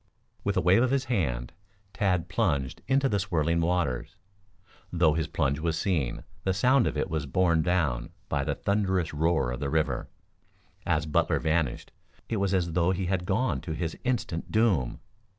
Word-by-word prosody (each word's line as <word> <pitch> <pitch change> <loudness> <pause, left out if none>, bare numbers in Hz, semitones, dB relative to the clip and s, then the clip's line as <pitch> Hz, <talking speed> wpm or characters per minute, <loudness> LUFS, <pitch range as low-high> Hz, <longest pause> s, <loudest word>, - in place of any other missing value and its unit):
With - - 0
a - - +4
wave 90 +6 +5
of 130 - +3
his 135 0 +1
hand, 65 - -1 0.4
Tad 90 -4 0
plunged 85 - -1
into 135 +1 +3
the 105 -6 0
swirling 85 -3 0
waters. 85 -2 -1 0.8
Though 85 -3 +3
his 80 0 -1
plunge 70 -3 0
was 80 0 -1
seen, 80 -12 -1 0.2
the 95 -1 0
sound 125 +5 +4
of - - -2
it - - 0
was 80 -3 -3
borne 85 +3 +2
down 75 -9 0 0.2
by - - 0
the - - -1
thunderous 95 -5 0
roar 75 -4 +1
of 60 - -4
the 70 - -2
river. 75 -4 0 0.8
As 80 -3 +1
Butler 75 - +1
vanished 80 -5 -1 0.4
it 115 - -1
was 100 -1 0
as 90 -3 0
though 85 +1 +2
he 95 0 0
had 90 0 -1
gone 115 +7 0
to 80 - -4
his 80 0 -3
instant 120 -10 -2
doom. 100 - +2
85 Hz, 175 wpm, -28 LUFS, 75-95 Hz, 0.8 s, wave